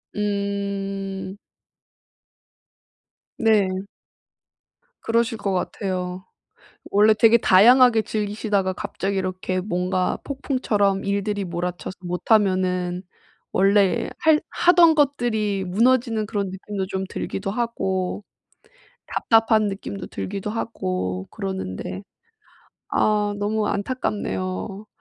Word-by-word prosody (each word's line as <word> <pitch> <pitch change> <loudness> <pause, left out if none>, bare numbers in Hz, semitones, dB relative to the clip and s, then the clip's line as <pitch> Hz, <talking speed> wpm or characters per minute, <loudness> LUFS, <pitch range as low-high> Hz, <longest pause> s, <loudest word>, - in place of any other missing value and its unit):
음. 200 -1 -3 2.0
네. 200 -4 +2 1.2
그러실 230 0 +1
것 200 - -2
같아요. 185 0 -3 0.7
원래 210 +2 +5
되게 225 +2 +6
다양하게 230 +4 +6
즐기시다가 205 -3 -1
갑자기 195 +1 -3
이렇게 185 0 -2
뭔가 180 -1 -1
폭풍처럼 215 -8 0
일들이 200 0 -1
몰아쳐서 175 +1 -4
못하면은 180 -1 +1 0.5
원래 200 +3 +3
할 315 -1 +4
하던 345 -2 +5
것들이 230 -9 +1
무너지는 230 +2 +2
그런 200 -3 -2
느낌도 190 0 -5
좀 190 0 -3
들기도 195 0 -4
하고 200 -4 -2 0.8
답답한 225 -1 +3
느낌도 195 0 -6
들기도 200 +1 -5
하고 95 - -3
그러는데, 190 - -5 0.9
아 210 -1 +1
너무 210 +1 0
안타깝네요. 200 -2 -3
200 Hz, 220 characters per minute, -23 LUFS, 190-220 Hz, 2.0 s, 되게